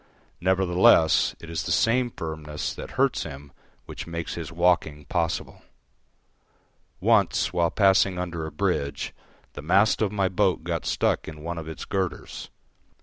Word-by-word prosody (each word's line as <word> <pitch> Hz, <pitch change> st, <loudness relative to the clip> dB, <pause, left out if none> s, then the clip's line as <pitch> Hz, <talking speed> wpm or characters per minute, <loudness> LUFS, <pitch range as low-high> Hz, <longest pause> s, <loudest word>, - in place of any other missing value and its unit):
Nevertheless 90 Hz, -3 st, +4 dB
it 85 Hz, -, -11 dB
is 80 Hz, 0 st, -3 dB
the -, -, -4 dB
same 120 Hz, +2 st, +2 dB
firmness 80 Hz, -6 st, -5 dB
that -, -, -8 dB
hurts -, -, +2 dB
him 70 Hz, +1 st, -8 dB, 0.3 s
which -, -, -8 dB
makes 85 Hz, 0 st, -4 dB
his 85 Hz, -1 st, -6 dB
walking 85 Hz, -4 st, +1 dB
possible. 85 Hz, 0 st, -2 dB, 1.4 s
Once, 100 Hz, -3 st, +2 dB
while 85 Hz, -1 st, +2 dB
passing 95 Hz, -2 st, +3 dB
under 85 Hz, -3 st, -4 dB
a -, -, -7 dB
bridge, 70 Hz, 0 st, -2 dB, 0.4 s
the -, -, -7 dB
mast 100 Hz, +9 st, +3 dB
of 105 Hz, -3 st, +1 dB
my 100 Hz, -2 st, +1 dB
boat 95 Hz, -3 st, +1 dB
got 85 Hz, -1 st, -3 dB
stuck -, -, 0 dB
in 75 Hz, -1 st, -9 dB
one 85 Hz, 0 st, -4 dB
of 80 Hz, -, -8 dB
its 80 Hz, -, -7 dB
girders. 95 Hz, -3 st, -4 dB
85 Hz, 145 wpm, -25 LUFS, 80-95 Hz, 1.4 s, Nevertheless